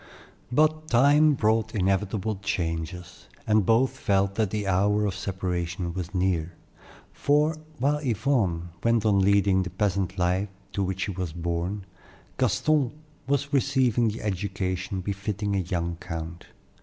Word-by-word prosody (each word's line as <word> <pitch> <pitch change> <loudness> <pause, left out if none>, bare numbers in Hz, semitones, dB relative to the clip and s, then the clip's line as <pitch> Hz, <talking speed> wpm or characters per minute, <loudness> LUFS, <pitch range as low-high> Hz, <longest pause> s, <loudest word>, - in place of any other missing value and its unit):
But 155 +3 +2
time 145 +5 +5
brought 110 -1 +1
inevitable 100 +2 0
changes, 85 -2 -4 0.2
and 110 -3 +3
both 115 +4 +4
felt 100 -1 +1
that 110 -1 0
the 105 0 -2
hour 100 +3 +2
of 100 - -1
separation 90 -2 -3
was 90 +1 -5
near; 90 -3 0 0.6
for, 150 +2 +2 0.2
while 145 +3 +1
Yvonne 110 - 0
went 115 -2 +2
on 100 -2 +4
leading 100 -1 +4
the 90 - -3
peasant 95 0 -1
life 90 +3 +1 0.2
to 100 - -1
which 95 0 -2
she 100 0 -1
was 90 -4 -4
born, 85 +4 -3 0.5
Gaston 130 +3 +2 0.3
was 140 +1 0
receiving 130 -4 +2
the 110 +1 -3
education 95 -2 -2
befitting 100 +1 -2
a - - +1
young 85 -2 -2
count. 85 -1 -7
100 Hz, 135 wpm, -26 LUFS, 90-115 Hz, 0.6 s, time